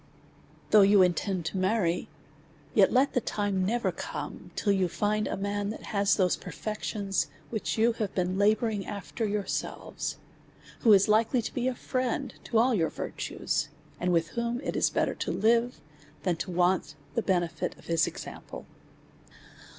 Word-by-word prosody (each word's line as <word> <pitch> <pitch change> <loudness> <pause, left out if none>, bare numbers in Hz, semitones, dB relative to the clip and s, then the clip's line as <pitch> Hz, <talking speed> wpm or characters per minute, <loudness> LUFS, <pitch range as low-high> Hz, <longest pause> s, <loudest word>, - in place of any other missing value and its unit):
Though 215 - +8
you 200 -1 +7
intend 180 0 0
to 175 - -2
marry, 185 -3 +1 0.6
yet - - +5
let 260 +3 +3
the 250 - +2
time 205 -3 -1
never 235 +5 +1
come - - -6
till 205 - +1
you 190 -2 +2
find 210 +4 0
a - - -2
man 200 +1 -2
tlmt - - -10
has 200 -2 +2
those 185 -3 +2
perfections, 210 -2 -3 0.2
which 220 -1 -2
you 230 +2 +4
have 215 -3 -3
been 185 0 0
labouring 215 0 +2
after 205 +2 -3
yourselves; 205 -1 -3 0.6
who 225 - +5
is 200 -1 +6
likely 225 +3 +3
to - - -5
be 250 0 -1
a 260 - 0
friend 255 +2 -2
to 230 - 0
all 245 +3 +4
your 165 -7 +2
virtues, - - -3 0.3
and 180 +1 +1
with 165 -2 +2
whom 235 +3 -2
it - - -3
is - - +3
better - - 0
to - - -3
live, 235 +2 +2 0.4
than 180 -3 +1
to 170 - -4
want 180 +1 +1 0.2
the 230 - +1
benefit 175 -5 -1
of - - -17
his 165 -2 +2
example. - - -8
205 Hz, 165 wpm, -28 LUFS, 185-225 Hz, 0.6 s, Though